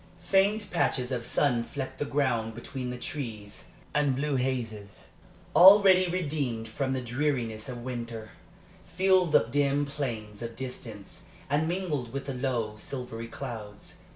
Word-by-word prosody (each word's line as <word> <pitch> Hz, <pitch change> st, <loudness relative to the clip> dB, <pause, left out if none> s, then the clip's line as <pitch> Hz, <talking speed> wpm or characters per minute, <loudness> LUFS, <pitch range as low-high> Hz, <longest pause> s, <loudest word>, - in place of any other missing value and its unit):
Faint 200 Hz, +4 st, +2 dB
patches 125 Hz, 0 st, 0 dB
of 120 Hz, -2 st, -2 dB
sun 125 Hz, -2 st, +1 dB
flecked 130 Hz, +1 st, -6 dB
the 145 Hz, -, 0 dB
ground 120 Hz, -6 st, 0 dB
between 125 Hz, +2 st, -5 dB
the 125 Hz, -, -4 dB
trees, 115 Hz, -7 st, -6 dB, 0.3 s
and 145 Hz, -3 st, +2 dB
blue 145 Hz, +1 st, 0 dB
hazes, 115 Hz, -6 st, -3 dB, 0.5 s
already 190 Hz, -1 st, +8 dB
redeemed 145 Hz, -10 st, -2 dB
from 130 Hz, +4 st, -2 dB
the 130 Hz, -, -1 dB
dreariness 125 Hz, -3 st, -1 dB
of 120 Hz, -2 st, -6 dB
winter, 115 Hz, -3 st, -5 dB, 0.6 s
filled 185 Hz, -2 st, +3 dB
the -, -, +6 dB
dim 140 Hz, +4 st, +1 dB
planes 115 Hz, -7 st, -5 dB
of 115 Hz, -1 st, -5 dB
distance 115 Hz, -5 st, -8 dB, 0.3 s
and 150 Hz, +2 st, +2 dB
mingled 165 Hz, -9 st, -2 dB
with 135 Hz, 0 st, -4 dB
the 135 Hz, -, -3 dB
low, 125 Hz, -4 st, -1 dB
silvery 115 Hz, -1 st, -6 dB
clouds. 105 Hz, -3 st, -8 dB
130 Hz, 140 wpm, -28 LUFS, 115-145 Hz, 0.6 s, already